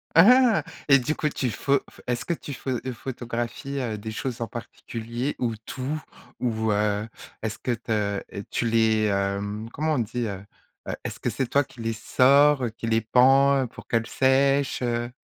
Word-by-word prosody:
Ah! 240 Hz, +5 st, +7 dB, 0.3 s
Et 140 Hz, -, +9 dB
du 150 Hz, +5 st, -1 dB
coup 150 Hz, -, 0 dB
tu 130 Hz, -3 st, -2 dB
pho 140 Hz, +7 st, +2 dB
tu -, -, -26 dB
f -, -, -17 dB
est-ce 120 Hz, -1 st, -1 dB
que 170 Hz, -, 0 dB
tu 145 Hz, -3 st, -7 dB
pho 130 Hz, -, -4 dB, 0.2 s
photographies, 120 Hz, +3 st, -4 dB
heu, 115 Hz, -4 st, -2 dB
des 110 Hz, +2 st, -6 dB
choses 120 Hz, +1 st, -4 dB
en 115 Hz, -, -1 dB
particulier? 120 Hz, +2 st, -5 dB
Ou 115 Hz, -3 st, 0 dB
tout? 145 Hz, +4 st, -4 dB, 0.4 s
Ou, 110 Hz, -3 st, 0 dB
heu, 105 Hz, +1 st, +1 dB, 0.4 s
est-ce 110 Hz, 0 st, -3 dB
que 125 Hz, -, -2 dB
te 105 Hz, -3 st, -1 dB, 0.3 s
tu 120 Hz, -, -1 dB
les, 110 Hz, -1 st, +3 dB
hem, 100 Hz, +2 st, -1 dB
comment 155 Hz, +1 st, 0 dB
on 135 Hz, -, +1 dB
dit, 115 Hz, +1 st, -2 dB
heu? 95 Hz, -1 st, -6 dB, 0.4 s
Heu, -, -, -2 dB
est-ce -, -, -5 dB
que -, -, -1 dB
c'est 135 Hz, -, -1 dB
toi 140 Hz, +3 st, +3 dB
qui 130 Hz, -3 st, -18 dB
les 115 Hz, 0 st, -1 dB
sors, 135 Hz, +4 st, +4 dB
qui 115 Hz, -, -5 dB
les 115 Hz, 0 st, +2 dB
pend, 135 Hz, +3 st, +4 dB
pour -, -, -13 dB
qu'elles 115 Hz, 0 st, 0 dB
sèchent, 135 Hz, +2 st, +2 dB
heu 120 Hz, 0 st, -1 dB
120 Hz, 185 wpm, -25 LUFS, 110-135 Hz, 0.4 s, Et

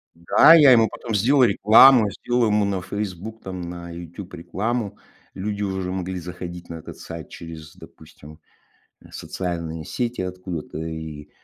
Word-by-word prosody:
Да, 85 Hz, -, +6 dB
я 150 Hz, -5 st, +8 dB
ему 115 Hz, -3 st, +5 dB
потом 115 Hz, -3 st, -5 dB
сделал 130 Hz, +6 st, +4 dB
рекламу, 110 Hz, +2 st, +6 dB
сделал 120 Hz, +4 st, 0 dB
ему 105 Hz, -1 st, +2 dB
на 95 Hz, -2 st, -2 dB
Facebook, 100 Hz, +3 st, -6 dB
там, 95 Hz, -1 st, -7 dB
на 85 Hz, 0 st, -7 dB
YouTube 85 Hz, +3 st, -9 dB
рекламу. 105 Hz, +4 st, -3 dB, 0.4 s
Люди 105 Hz, +1 st, -4 dB
уже 95 Hz, -2 st, -3 dB
могли 95 Hz, 0 st, -4 dB
заходить 90 Hz, 0 st, -8 dB
на 85 Hz, -, -6 dB
этот 80 Hz, -, -10 dB
сайт 80 Hz, -2 st, -9 dB
через, 80 Hz, -2 st, -10 dB
допустим, 75 Hz, +1 st, -15 dB, 0.6 s
э, -, -, -16 dB
социальные 85 Hz, -3 st, -5 dB
сети 120 Hz, -3 st, -3 dB
откуда-то. 90 Hz, -4 st, -6 dB
И, 80 Hz, -2 st, -7 dB
95 Hz, 145 wpm, -23 LUFS, 85-105 Hz, 0.6 s, я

